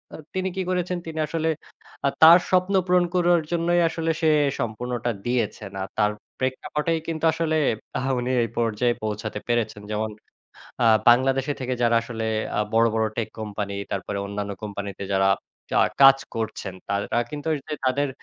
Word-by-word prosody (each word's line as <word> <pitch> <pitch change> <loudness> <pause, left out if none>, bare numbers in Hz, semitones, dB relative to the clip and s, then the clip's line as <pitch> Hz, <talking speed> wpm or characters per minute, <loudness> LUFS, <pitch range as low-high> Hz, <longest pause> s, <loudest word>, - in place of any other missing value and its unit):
আ - - -8 0.2
তিনি 190 0 -1
কি 190 - -1
করেছেন? 180 0 -1
তিনি 160 -1 -5
আসলে 160 +1 -1 0.6
আ - - +4
তার 165 +2 +10
স্বপ্ন 185 +1 +2
পূরণ 180 -1 +3
করার 175 -1 +4
জন্যই 175 +1 +2
আসলে 165 0 -1
সে 160 - +4 0.3
সম্পূর্ণটা 120 +1 -2
দিয়েছেন। 110 -4 -2
আর - - -5
তার 105 -1 +3 0.3
প্রেক্ষাপটেই 150 +5 -1
কিন্তু 165 -1 -2
আসলে, 160 -1 0 0.4
আ - - -3 0.2
উনি 125 +1 -1
এই 115 - -2
পর্যায়ে 120 +1 +1
পৌঁছাতে 105 0 -3
পেরেছেন। 120 -3 -1
যেমন 110 +1 -1 0.7
আ - - +5 0.2
বাংলাদেশে 135 +3 +4
থেকে 130 0 -1
যারা 115 -1 +4
আসলে 115 -1 -5 0.3
আ - - +3
বড়, 115 +1 +5
বড় 110 0 +2
টেক 115 - -1
কোম্পানি, 105 -2 -4 0.2
তারপরে 100 +1 -3
অন্যান্য 100 0 -4
কোম্পানিতে 100 -2 -5
যারা 95 0 +3 0.6
আ - - +3 0.2
কাজ 135 0 +9 0.2
করছেন, 110 -4 -4
তারা 100 +2 -1
কিন্তু 150 +1 -5 0.4
তাদের 140 +2 +1
125 Hz, 160 wpm, -24 LUFS, 110-160 Hz, 0.7 s, তার